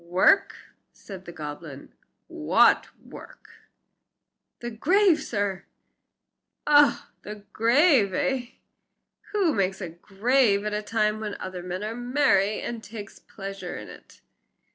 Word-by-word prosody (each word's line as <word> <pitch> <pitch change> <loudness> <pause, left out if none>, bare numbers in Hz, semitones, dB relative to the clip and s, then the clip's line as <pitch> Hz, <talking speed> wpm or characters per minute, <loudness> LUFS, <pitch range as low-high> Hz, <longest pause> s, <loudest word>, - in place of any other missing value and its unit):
"Work!" 180 - +3 0.4
said 190 -2 -11
the 175 - -8
goblin, 150 -2 -9 0.3
"what - - +3
work?" - - -14 1.1
"The 240 0 -6
grave, 350 - +3
sir." 200 -3 -3 1.0
"Oh! 290 -1 +4
the 210 -1 -10
grave, 240 - +4
eh? 250 +5 -1 0.8
Who 390 -7 +1
makes 190 -1 -1 0.2
graves 210 0 +2
at 210 0 -3
a 210 - -1
time 215 0 0
when 210 -2 -5
other 185 -1 -6
men 180 +2 -5
are 215 +1 -3
merry, 240 -5 +1
and 235 -2 -6
takes 205 -1 -10
a - - -33
pleasure 195 -1 -8
in - - -8
it?" - - -15
210 Hz, 120 wpm, -25 LUFS, 195-250 Hz, 1.1 s, Oh